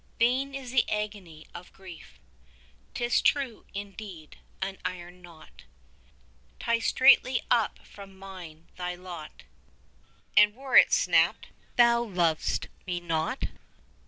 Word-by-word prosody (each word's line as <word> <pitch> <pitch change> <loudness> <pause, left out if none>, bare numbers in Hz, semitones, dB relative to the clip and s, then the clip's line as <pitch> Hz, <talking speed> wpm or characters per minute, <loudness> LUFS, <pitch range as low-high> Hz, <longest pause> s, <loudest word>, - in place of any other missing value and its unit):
5 - - -34
Vain 260 +4 +1
is 260 -3 -7
the 260 - +2
agony 205 -7 -5
of 180 - -11
grief. 185 -3 -13 0.8
'Tis 240 -1 +1
true, 270 -6 0
indeed, 195 -5 -8 0.2
an 195 0 -4
iron 180 0 -6
knot 155 - -16 0.9
Ties 230 -1 0
straitly 260 -1 +5
up 230 -3 +2
from 195 -1 -13
mine 180 -4 -11
thy 180 0 -4
lot, 175 -4 -10 0.9
And 210 +1 +6
were 265 +1 -4
it - - +8
snapt - - +2 0.3
thou 235 -1 +5
lov'st 175 -8 0 0.2
me 175 -1 -2
not! 165 +7 -2
195 Hz, 120 wpm, -28 LUFS, 175-235 Hz, 0.9 s, it